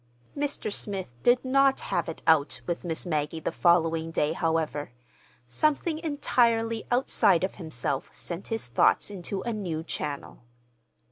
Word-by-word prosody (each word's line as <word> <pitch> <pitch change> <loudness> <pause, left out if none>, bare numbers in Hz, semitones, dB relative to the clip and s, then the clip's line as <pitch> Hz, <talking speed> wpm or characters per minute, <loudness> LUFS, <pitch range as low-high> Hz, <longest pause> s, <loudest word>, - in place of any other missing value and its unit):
Mr. 285 -7 -2
Smith 195 - -3
did 245 +1 +3
not 275 +1 +4
"have - - -2
it 165 - -8
out" 155 -3 +3
with 175 -1 -3
Miss 165 -1 +1
Maggie 155 -1 -1
the 160 - -2
following 165 -2 +2
day, 155 -1 0
however. 160 -5 -1 0.6
Something 305 - 0
entirely 230 -7 +1
outside 245 -8 +3
of 190 - -1
himself 140 -3 -3
sent 175 +2 -6
his 225 -1 -2
thoughts 120 - +3
into 190 0 -4
a 235 - -2
new 175 -7 -3
channel. 150 -3 -5
175 Hz, 140 wpm, -27 LUFS, 160-235 Hz, 0.6 s, not